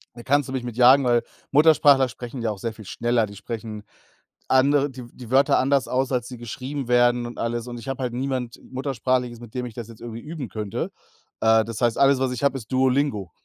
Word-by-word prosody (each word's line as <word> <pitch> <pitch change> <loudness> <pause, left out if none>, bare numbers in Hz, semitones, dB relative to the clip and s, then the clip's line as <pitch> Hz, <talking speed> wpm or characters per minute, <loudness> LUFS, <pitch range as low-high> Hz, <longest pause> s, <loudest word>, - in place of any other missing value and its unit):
da 120 - -9
kannst 145 +2 +2
du 130 - -6
mich 130 - -2
mit 120 -2 -6
jagen, 130 +2 +7
weil 120 -1 +2 0.3
Muttersprachler 145 -2 +5
sprechen 120 +1 -8
ja 115 -2 0
auch 100 - -7
sehr 115 +1 -3
viel 110 -1 -13
schneller. 120 +3 0
Die 100 -1 -11
sprechen 110 +1 -7 0.6
andere 140 +2 +3
die 125 -1 -9
die 125 -1 -11
Wörter 135 +1 +4
anders 135 0 +2
aus, 130 +1 0
als 125 -2 -1
sie 125 -1 -8
geschrieben 130 +3 -5
werden 120 0 +3
und 120 - -8
alles 115 0 -2
und 120 -1 -6
ich 115 - -11
habe 135 -1 -3
halt 120 - -2
niemand 130 -2 -3
Muttersprachliches, 130 -2 -2
mit 120 0 -13
dem 125 -1 -2
ich 120 - -8
das 115 0 -7
jetzt 115 -2 -14
irgendwie 115 -1 -7
üben 150 -5 -7
könnte, 105 -3 -4 0.5
äh, 110 0 +4
das 115 +1 -6
heißt, 120 -2 +2
alles, 140 -1 +4
was 130 -1 0
ich 125 +2 -5
habe, 140 - +2
ist 115 -2 -11
Duolingo. 130 - +1
125 Hz, 230 wpm, -24 LUFS, 115-135 Hz, 0.6 s, jagen